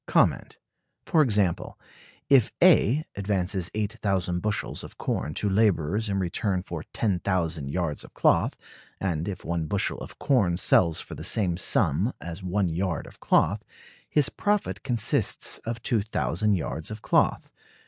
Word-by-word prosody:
For 160 - +3
example, 105 - +1 0.5
if 135 -5 +5
A 155 - +5
advances 95 -2 0
8,000 100 -4 -1
bushels 105 +1 -2
of - - -11
corn 75 - -2
to 105 - 0
laborers 100 0 +1
in 100 - 0
return 95 +1 -1
for 85 -4 -6
10,000 90 -7 -1
yards 85 -1 -2
of - - -14
cloth - - +2 0.4
(and 85 -4 -2
if 100 -3 -6
one 85 -2 -2
bushel 100 +2 -1
of - - -10
corn 100 -12 +2
sells 85 -3 +3
for - - -8
the - - -7
same 95 -6 +1
sum 90 - +2
as 85 +2 -7
one 95 0 0
yard 85 0 -2
of - - -14
cloth), - - +2 0.5
his 150 -2 +2
profit 205 0 -1
consists 120 -5 0
of 115 -1 -4
2,000 105 - 0
yards 80 -2 -4
of 110 0 -8
cloth. - - +1
95 Hz, 140 wpm, -26 LUFS, 85-110 Hz, 0.5 s, if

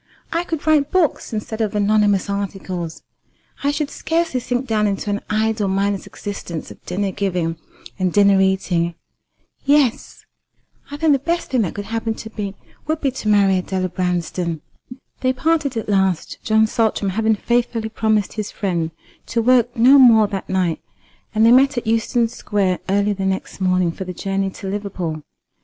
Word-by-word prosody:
I 335 +1 +1
could 325 -4 -4
write 305 -3 +3
books 350 -8 +1
instead 220 0 -4
of 215 -1 -1
anonymous 205 -1 +2
articles. 190 -4 -4 0.6
I 285 - +2
should 290 0 -2
scarcely 325 -4 -1
sink 245 +1 -2
down 215 -3 +1
into 200 +1 -2
an 205 - -2
idle 215 -1 +1
mindless 195 +1 -1
existence 190 -5 -6
of - - -14
dinner 195 +2 -1
giving 180 -5 -1 0.4
and 185 -1 +1
dinner 200 0 +5
eating. 180 -3 +1 0.7
Yes, 280 -4 +1 0.6
I 290 - -6
think 310 -1 +3
the 275 - +2
best 340 +5 -2
thing 255 -3 +2
that 185 - -2
could 205 - -5
happen 225 0 -2
to 220 - -9
me 200 -2 -4 0.3
would 315 0 0
be 275 -3 0
to 250 -4 -6
marry 200 -3 +4
Adela 185 0 -2
Branston." 175 -2 -2 0.6
They 255 0 +1
parted 295 -2 0
at 225 - -3
last, 190 -4 0
John 220 0 +4
Saltram 220 -3 0
having 220 +2 +2
faithfully 235 0 -1
promised 220 -2 0
his 215 -2 -4
friend 175 -6 -2 0.4
to 230 - -1
work 245 0 +3
no 260 +5 +7
more 225 -5 +7
that 195 -2 -5
night, 185 -3 0 0.5
and 220 +1 +4
they 230 - +7
met 270 +2 +5
at 240 - -2
Euston 230 +1 +1
Square 200 -5 -1
early 200 +1 +2
the 195 -1 -2
next 190 0 -3
morning 185 -2 +2
for 190 - -7
the 180 - -5
journey 195 +1 -1
to 190 +1 -8
Liverpool. 190 -6 -4
210 Hz, 170 wpm, -20 LUFS, 190-240 Hz, 0.7 s, no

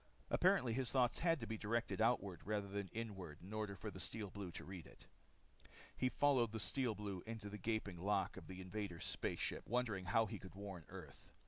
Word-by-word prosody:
Apparently 175 - +5
his 130 0 +1
thoughts 125 -3 +3
had 165 -2 +4
to 115 - -3
be 110 0 -3
directed 115 +1 0
outward, 100 -7 +3
rather 105 -1 0
than 100 0 -2
inward, 95 -8 -5
in 95 +4 -7
order 105 -2 -1
for 105 +3 -4
the 95 - -8
Steel 100 +2 -2
Blues 95 -4 -5
to - - -6
read 95 -3 -7
it. - - -15 0.9
He 130 - +2
followed 130 -6 +4
the 110 - -1
Steel 120 +1 +2
Blue 100 -3 -3
into 110 -3 -4
the 105 - -5
gaping 105 -4 -1
lock 100 +2 +2
of - - -8
the 95 0 -6
invaders' 95 -2 -3
space - - 0
ship - - 0
wondering 110 -5 +1
how 110 +5 +4
he 105 - -4
could 95 - -10
warn 95 -4 -6
Earth. - - -9
105 Hz, 210 wpm, -41 LUFS, 95-115 Hz, 0.9 s, Apparently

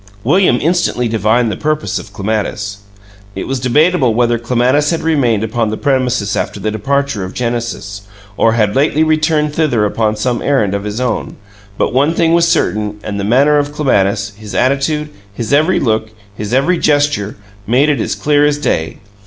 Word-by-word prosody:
William 150 -1 +3
instantly 165 -7 0
divined 110 +1 +1
the - - -3
purpose 155 +5 -2
of 100 - -11
Clematis. 100 0 -3 0.6
It - - -5
was 135 -1 -2
debatable 130 0 +2
whether 120 -1 +2
Clematis 125 +5 +1
had 165 - -1
remained 130 -10 +1
upon 110 0 -1
the 110 - -3
premises 130 -7 0
after - - -3
the 110 +2 -2
departure 135 0 -1
of 95 - -7
Genesis, 115 -4 -3 0.3
or 115 +1 +3
had 105 -3 +1
lately 150 +3 +2
returned 155 -1 +1
thither 140 -9 +1
upon 110 +1 0
some 120 +3 -1
errand 130 -9 +1
of 100 0 -3
his 105 +2 -4
own, 125 -1 -2 0.4
but - - 0
one 145 +6 +2
thing 165 -1 +2
was 170 0 +4
certain, 105 -8 0
and 100 -1 -4
the - - -2
manner 140 +8 +3
of 145 0 -2
Clematis 100 -8 +1
his 105 0 -9
attitude, 140 +4 0 0.3
his 115 +5 -3
every 155 +6 +3
look, 110 -3 0 0.3
his 105 +1 -5
every 140 +8 +2
gesture 145 -9 +1 0.3
made 130 +6 +3
it 145 -2 +1
as - - -2
clear 145 -1 +2
as 145 0 +2
day. 80 - -2
125 Hz, 175 wpm, -15 LUFS, 110-150 Hz, 0.6 s, was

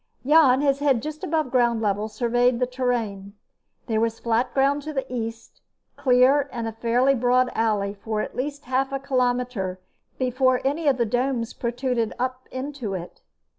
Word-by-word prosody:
Jan, 280 -3 +5
his 275 -1 +2
head 275 -5 +2
just 305 0 -6
above 310 -5 -1
ground 240 -2 +2
level, 210 0 0
surveyed 245 +2 +1
the 250 - +2
terrain. 230 -6 -3 0.5
There 220 -2 0
was 230 0 0
flat 235 +1 0
ground 280 +2 +2
to 310 +2 -6
the 270 -2 -2
east, 230 -1 -6 0.3
clear 270 +1 +4
in 235 -2 -4
a 225 - -2
fairly 240 +4 +2
broad 250 0 +2
alley 210 -3 0
for 215 +1 -4
at - - -4
least 285 +3 -4
half 260 +2 0
a 275 - -1
kilometer 250 -8 -1 0.4
before 255 0 +2
any 295 +3 0
of 270 -3 +4
the 235 - +1
domes 245 0 -1
protruded 240 -1 -2
up 255 +1 -3
into 260 -6 -4
it. 175 -1 -8
250 Hz, 170 wpm, -24 LUFS, 230-270 Hz, 0.5 s, Jan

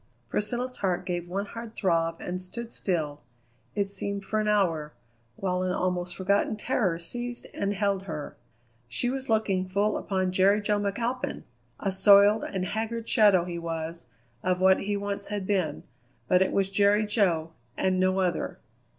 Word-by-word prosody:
Priscilla's 245 +4 -1
heart 185 -3 -1
gave 175 -1 -3
one 195 +3 -2
hard 230 +2 -8
throb 165 -3 +1
and 180 +1 -4
stood 230 +5 -8
still, 155 -6 -2 0.5
it 200 -1 +2
seemed 200 0 -3
for 215 - 0
an 215 - 0
hour, 165 -8 +1 0.4
while 180 +2 -1
an 185 0 0
almost 180 -1 -1
forgotten 200 +3 +1
terror 210 -6 0
seized 240 +8 -5
and 200 0 -1
held 200 -1 0
her. 150 -6 -6 0.5
She 245 - 0
was 265 -1 -4
looking 195 -4 +1
full 200 +3 +1
upon 185 -2 -1
Jerry 195 +3 +4
Jo 210 0 +1
McAlpin! 230 +5 -2 0.4
A 195 - -1
soiled 200 +2 +6
and 190 -2 -2
haggard 225 +3 -3
shadow 205 -5 +5
he 175 -1 -4
was 165 -3 -5 0.3
of 180 0 0
what 190 0 +5
he 205 +1 -1
once 200 0 -3
had 205 -2 -3
been, 185 -7 0 0.4
but 180 - +4
it 190 - +2
was 195 -1 +1
Jerry 205 +2 +4
Jo 175 -7 +1 0.3
and 185 -1 +1
no 185 +1 +2
other. 180 -3 -1
195 Hz, 165 wpm, -27 LUFS, 180-210 Hz, 0.5 s, soiled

